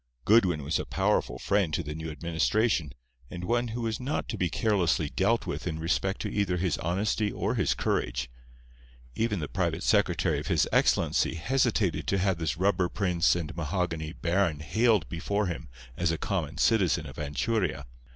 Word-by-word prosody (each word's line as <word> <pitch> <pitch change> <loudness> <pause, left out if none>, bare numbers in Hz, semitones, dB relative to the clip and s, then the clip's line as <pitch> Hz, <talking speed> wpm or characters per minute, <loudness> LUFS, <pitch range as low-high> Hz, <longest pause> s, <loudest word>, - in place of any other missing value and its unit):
Goodwin 95 -9 +4
was 75 +4 0
a - - -3
powerful - - 0
friend 100 -5 +1
to 85 - -2
the 75 0 -5
new 80 +1 -5
administration, 85 - 0 0.4
and 90 0 -7
one 120 +5 +1
who 115 +2 -4
was 115 -1 -2
not 130 +4 -2
to - - -2
be 90 -2 0
carelessly 90 -7 +1
dealt 100 - +1
with - - -4
in 80 -2 -2
respect 95 +4 -1
to 105 - -3
either 100 -3 0
his 90 -2 0
honesty 100 +5 0
or - - -1
his - - +1
courage. - - -1 0.9
Even 110 - 0
the 75 - -3
private - - -1
secretary - - +2
of - - -6
His - - +2
Excellency - - +2
hesitated 110 -1 0
to 100 - +1
have 95 -2 +1
this 80 -1 -1
rubber 95 -1 +2
prince 90 -4 +2
and 85 -1 -4
mahogany 80 -1 -2
baron 85 -2 0
haled 110 0 +2
before 100 +5 -1
him 80 -5 -5 0.3
as 90 +3 0
a 80 - -1
common 85 -6 -3
citizen 105 -7 +2
of - - -10
Anchuria. 75 - -1
90 Hz, 175 wpm, -28 LUFS, 80-105 Hz, 0.9 s, Goodwin